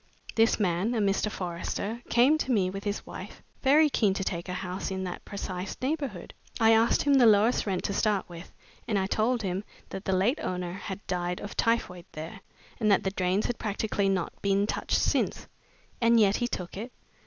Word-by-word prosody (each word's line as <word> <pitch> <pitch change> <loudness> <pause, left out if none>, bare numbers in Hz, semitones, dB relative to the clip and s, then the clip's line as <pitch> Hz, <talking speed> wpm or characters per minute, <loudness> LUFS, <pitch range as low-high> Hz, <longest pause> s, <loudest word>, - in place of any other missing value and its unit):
This 225 +1 +3
man 195 +4 +1
a - - +1
Mr. 200 +1 +1
Forrester 195 +5 -4
came 250 +6 +5
to 265 - -1
me 190 -6 +2
with 195 +1 -7
his 205 0 -2
wife, - - -9 0.2
very 295 +3 +5
keen 210 -9 +2
to 195 - -2
take 175 0 -3
a - - -2
house 185 0 -4
in 190 -1 -3
that 180 -1 -5
precise 190 -2 -5
neighborhood. 265 - -3 0.3
I 225 -1 +6
asked 225 +1 +4
him 285 - +3
the 255 -4 +6
lowest 215 +2 +4
rent 185 -2 -1
to 200 - -1
start 205 -1 +1
with, 170 0 -10 0.4
and 215 -4 +1
I 190 - +1
told 220 +4 +1
him 190 +1 -2 0.3
that 195 - -7
the 190 - +1
late 205 +11 +2
owner 180 -1 -3
had 195 +1 -7
died 180 -1 -2
of 205 - -7
typhoid 180 -7 0
there, 155 +2 -7 0.4
and 215 -3 +3
that 195 - +4
the 190 - 0
drains 185 +1 0
had 245 - -2
practically 205 -1 -1
not 185 -3 -1
been 200 0 +2
touched - - 0
since." - - 0 0.6
"And 230 0 +5
yet 205 -2 +4
he 240 - 0
took 180 -6 -5
it?" 230 +5 -6
200 Hz, 200 wpm, -28 LUFS, 185-225 Hz, 0.6 s, I